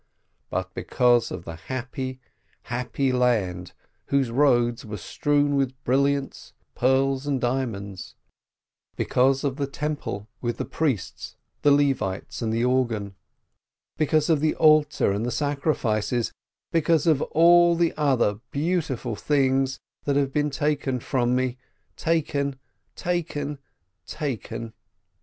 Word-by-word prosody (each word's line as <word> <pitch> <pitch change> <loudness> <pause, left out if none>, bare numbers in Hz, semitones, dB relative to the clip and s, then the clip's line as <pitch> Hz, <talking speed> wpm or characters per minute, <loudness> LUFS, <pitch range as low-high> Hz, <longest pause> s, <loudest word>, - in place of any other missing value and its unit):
But 95 0 -3
because 120 -2 +2
of 85 - -7
the 85 - -6
happy, 130 - -5 0.4
happy 125 +2 -1
land 100 -9 0 0.3
whose 135 -4 +1
roads 120 -2 +3
were 105 -2 -6
strewn 145 - +1
with 130 -2 0
brilliants, 140 +2 0 0.2
pearls, 135 +2 +1
and 140 -2 0
diamonds; 115 -7 -3 0.8
because 135 +2 +2
of 140 -2 -1
the 140 -2 -1
temple 140 -8 -4
with 120 -1 -2
the - - -3
priests, 135 - -2 0.3
the 145 - +4
Levites, 135 -11 +1
and 110 -2 -1
the 115 +2 +1
organ; 120 -6 0 0.8
because 155 0 +2
of 160 -3 +3
the 155 +1 +1
altar 155 -7 +4
and 100 +3 -1
the 120 - -1
sacrifices; 125 -4 0 0.4
because 165 -2 +2
of 155 -4 +3
all 170 +1 +5
the 170 -1 +1
other 130 -8 +2
beautiful 145 -7 -1
things 135 +1 +1 0.3
that 140 - +1
have 140 -1 +1
been 150 0 +1
taken 145 -3 -1
from 125 0 0
me, 130 0 -1 0.4
taken, 145 -4 0 0.4
taken, 150 -5 -2 0.5
taken 125 -6 -4
135 Hz, 120 wpm, -25 LUFS, 120-145 Hz, 0.8 s, all